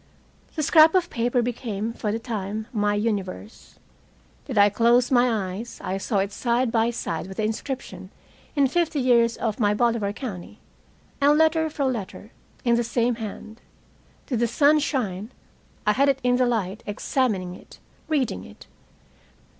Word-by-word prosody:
The 310 - -1
scrap 315 +3 +6
of 355 -2 +1
paper 240 +1 +1
became, 230 -2 -3
for 210 -2 -3
the 220 - -1
time, 215 -2 -4
my 205 -2 +1
universe. 205 -1 -4 0.7
Did 255 -6 -5
I 205 0 +7
close 235 +4 +3
my 245 -1 +4 0.2
eyes, 225 +5 -7
I 190 +1 -2
saw 205 +2 -1
it 195 +1 0
side 240 +3 0
by 225 0 +2
side 165 -7 -4
with 190 - -9
the 215 - -1
inscription 250 +5 -4 0.5
in 280 -2 +4
"Fifty 320 +2 0
years 235 -2 +3
of 220 -1 -2
my 205 -2 +2
Bolivar 230 -3 +1
County," 205 -4 -7 0.6
and 290 +1 +5
letter 320 0 +3
for 290 -2 -2
letter, 220 -3 -4 0.3
in 235 -1 +4
the 240 - +1
same 235 +1 +1
hand. 215 +1 -8 0.6
Did 245 -5 -2
the 235 - +2
sun 290 +6 +4
shine, 215 -7 -2 0.5
I 210 - +4
had 275 +6 +3
it 275 - +2
in 245 0 +3
the 250 -1 +3
light, 215 -3 -2
examining 205 -4 -1
it, - - -14 0.3
reading 260 - -1
it. 100 - -14
235 Hz, 160 wpm, -24 LUFS, 205-255 Hz, 0.7 s, I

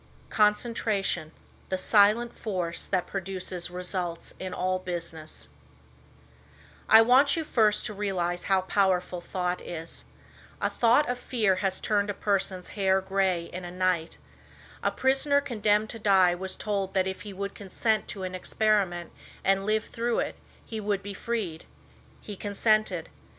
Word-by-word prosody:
CONCENTRATION, 210 -5 +1 0.4
THE 190 - 0
SILENT 215 +5 +4
FORCE 180 -6 -2
THAT 185 -2 0
PRODUCES 185 -2 -4
RESULTS 180 -1 -3
IN 185 0 -5
ALL 185 0 -1
BUSINESS 170 -3 -6 1.4
I 220 +1 +9
want 265 +5 +5
you 325 - 0
first 215 -8 +2
to 215 - -3
realize 180 -4 -2
how 190 -1 +3
powerful 185 -2 +1
thought 180 0 -2
is. 165 -1 -7 0.5
A - - 0
thought 240 +5 +4
of 245 0 -2
fear 215 -7 +1
has 190 -1 0
turned 205 -1 +1
a 205 - -2
person's 190 -3 0
hair 190 -2 +2
gray 190 -2 0
in 180 +1 -5
a 175 - -6
night. 180 -2 -1 0.6
A - - +2
prisoner 275 +2 +2
condemned 215 -5 +1
to 230 - -7
die 190 -4 +5
was 190 +2 -5
told 200 -2 -2
that 190 -1 +3
if 190 0 -4
he 205 - -8
would 200 +1 -5
consent 215 +3 -1
to 195 - -6
an 185 0 -4
experiment 185 -2 0 0.3
and 195 +1 +2
lived 215 0 0
through 235 0 -1
it - - -1 0.3
he 220 - -5
would 205 -2 -1
be 200 0 -6
freed. 195 -8 -3 0.6
He 205 - -7
consented. 215 +2 +1
195 Hz, 150 wpm, -27 LUFS, 185-215 Hz, 1.4 s, I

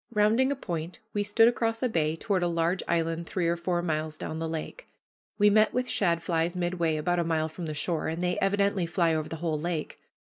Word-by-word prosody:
Rounding 225 +5 +3
a - - 0
point, 170 - -5 0.2
we 205 - 0
stood 210 +3 +4
across 230 0 0
a - - +4
bay 160 -8 0
toward 190 +2 -1
a 175 - +2
large 170 +2 0
island 165 0 0
three 180 -3 -1
or 170 - +2
four 175 0 -1
miles 155 -2 -2
down 160 - -4
the 165 0 -2
lake. 165 - -6 0.5
We 205 0 +5
met 215 +1 +4
with 250 0 +1
shadflies 170 -3 0
midway, 175 -3 0
about 175 +3 0
a - - +2
mile 160 -1 0
from 165 +1 -6
the 155 - -4
shore, 160 +2 -1
and 165 +2 -3
they 180 0 0
evidently 200 -2 +1
fly 165 0 +2
over 155 -1 -2
the - - -4
whole 155 -2 0
lake. 165 -1 -3
170 Hz, 220 wpm, -28 LUFS, 160-200 Hz, 0.5 s, We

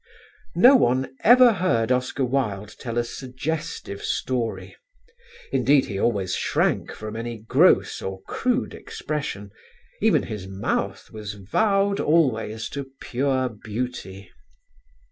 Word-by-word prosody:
No 250 +10 +8
one 130 - +2
ever 245 +1 +7
heard 125 - +1
Oscar 125 +1 0
Wilde 105 -6 -2
tell 115 -1 -4
a 120 - +2
suggestive 130 -2 -5
story; 120 -3 -2 0.8
indeed 140 -1 +3
he 100 -6 -4
always 100 -6 0
shrank - - 0
from 110 0 -7
any 115 +1 -4
gross 110 +1 +3
or 95 0 -6
crude 250 - -1
expression; 105 -10 -5 0.5
even - - +3
his 100 -3 -6
mouth 95 +1 -3
was 105 -1 -7
vowed 195 - +1
always 115 -8 +1
to 140 -2 -6
pure 130 0 0
beauty. 105 -4 -6
125 Hz, 115 wpm, -24 LUFS, 105-145 Hz, 0.8 s, No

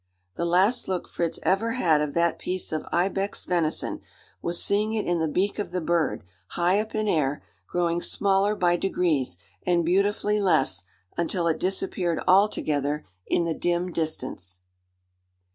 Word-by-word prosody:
The 170 - -2
last 190 +8 +3
look 185 -2 -2
Fritz 170 -2 -2
ever 220 +5 +2
had 165 -11 +3
of 150 -1 -2
that 170 -1 +2
piece 185 0 -3
of 155 -1 -3
ibex 195 +3 0
venison, 170 -3 -1 0.4
was 170 0 -1
seeing 210 +2 +1
it 215 - -1
in 175 -1 +1
the 160 - +1
beak 190 +8 0
of 205 - -2
the 180 +1 -2
bird, 170 - 0 0.2
high 180 - +2
up 220 +1 -4
in 215 0 0
air, 145 -6 +1 0.2
growing 175 -1 0
smaller 200 +2 +2
by 175 -3 +2
degrees 160 - 0 0.2
and 175 -2 +1
beautifully 205 +3 +2
less 115 - +2 0.3
until 170 +1 0
it 160 -1 +1
disappeared 185 -2 -1
altogether 150 -7 +2 0.2
in - - +2
the 165 -1 0
dim 175 +2 -1
distance. 130 - -3
175 Hz, 155 wpm, -26 LUFS, 160-195 Hz, 0.4 s, last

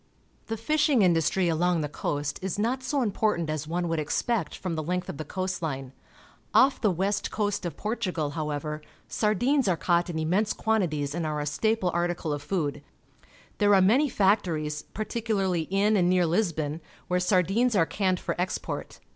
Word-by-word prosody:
The 225 - -3
fishing 290 0 +2
industry 175 +1 +2
along 170 +1 +1
the 150 - -1
coast 145 0 -3
is 190 -1 -3
not 240 +5 0
so 260 +1 0
important 200 -6 0
as 155 -1 -3
one 175 +2 -1
would 165 -1 -1
expect 225 +9 -1
from 185 -3 -4
the 160 - -2
length 180 +3 -2
of - - -5
the 155 - -4
coast 185 +4 -3
line. 135 -5 -4 0.6
Off 265 0 +5
the 215 - +3
west 195 +3 -1
coast 205 -3 -1
of 170 - -7
Portugal, 180 -9 -2
however, 150 0 -3 0.3
sardines 245 +6 +1
are 180 -3 +2
caught 175 +1 +1
in 170 - -4
inmiense 180 +7 0
quantities 155 -10 0
and 170 +1 -2
are 155 -1 -2
a 145 - -2
staple 195 +5 0
article 175 -2 -1
of 145 - -4
food. 145 -3 -2 0.8
There 205 -1 +5
are - - +6
many 245 +11 +4
factories, 165 -8 +1
particu 225 +1 -2
larly 185 -5 0
in 200 +3 +2
and 180 -3 +3
near 180 -1 +3
Lisbon, 165 -4 -1 0.3
where 180 0 +1
sardines 195 +6 +2
are 165 -4 +4
canned 185 +2 0
for - - -2
export. 185 - -4
180 Hz, 180 wpm, -27 LUFS, 160-210 Hz, 0.8 s, are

